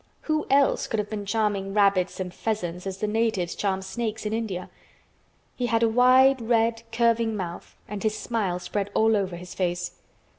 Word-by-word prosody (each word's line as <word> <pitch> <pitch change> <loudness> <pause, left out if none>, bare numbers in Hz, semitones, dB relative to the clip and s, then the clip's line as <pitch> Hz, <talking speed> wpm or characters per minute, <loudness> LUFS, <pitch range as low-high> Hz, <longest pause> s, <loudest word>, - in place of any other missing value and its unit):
Who 310 -1 -1
else 275 0 +3
could 225 - -2
have 210 0 -2
been 205 -2 -4
charming 200 -2 0
rabbits 195 -3 +3
and 180 -1 -4
pheasants 180 -5 -3
as 190 -1 -4
the 210 - -2
natives 210 -5 0
charm 190 -2 -1
snakes 220 +2 -4
in 210 - -1
India? 215 -5 -3 0.8
He 245 - -1
had 230 -1 +2
a - - +5
wide, 255 +2 +5
red, 230 0 +2
curving 230 -1 +2
mouth 175 -3 -6
and 205 -1 -5
his 215 -1 0
smile 205 -7 -1
spread 200 +2 -3
all 220 0 +4
over 190 -3 -1
his 180 +1 -9
face. 175 -1 -2
210 Hz, 180 wpm, -26 LUFS, 190-230 Hz, 0.8 s, a